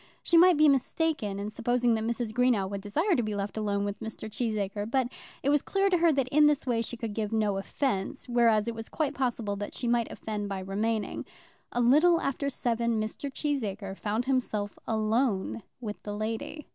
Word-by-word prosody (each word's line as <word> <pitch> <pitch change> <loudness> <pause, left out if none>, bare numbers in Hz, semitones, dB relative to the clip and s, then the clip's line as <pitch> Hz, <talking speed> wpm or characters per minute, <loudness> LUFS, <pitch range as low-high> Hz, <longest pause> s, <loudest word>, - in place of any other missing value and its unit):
She 340 - +2
might 350 0 +7
be 305 0 +6
mistaken 275 -5 +1
in 205 +1 -4
supposing 240 +1 +1
that 220 -1 0
Mrs. 230 -1 -2
Greenow 240 -5 +2
would 200 0 -5
desire 315 - +1
to 245 - +2
be 215 -2 -2
left 200 0 -3
alone 205 -2 0
with 205 0 -4
Mr. 220 -1 -6
Cheesacre; 210 -2 -2
but 255 0 +1 0.3
it 280 - +3
was 295 -1 +4
clear 390 0 +1
to 360 - +4
her 335 -1 +5
that 270 -3 +1
in 300 +2 +5
this 295 -2 +2
way 235 -3 +1
she 240 +1 -5
could 225 -3 -4
give 215 -1 -2
no 210 -3 +1
offence, 195 0 -2
whereas 230 -3 +3
it 235 - -1
was 225 0 -7
quite 295 -3 -1
possible 240 -6 -1
that 205 0 -5
she 245 - -3
might 235 -1 +1
offend 210 -2 -4
by 195 - -2
remaining. 210 +3 -2 0.5
A 245 - 0
little 310 +8 +5
after 280 +1 -1
seven 235 -3 0
Mr. 220 +6 -4
Cheesacre 215 -10 -2
found 215 +4 -2
himself 230 -6 -1
alone 220 -1 0 0.2
with 215 -4 -6
the 205 0 -5
lady. 225 +8 -4
230 Hz, 200 wpm, -29 LUFS, 210-270 Hz, 0.5 s, might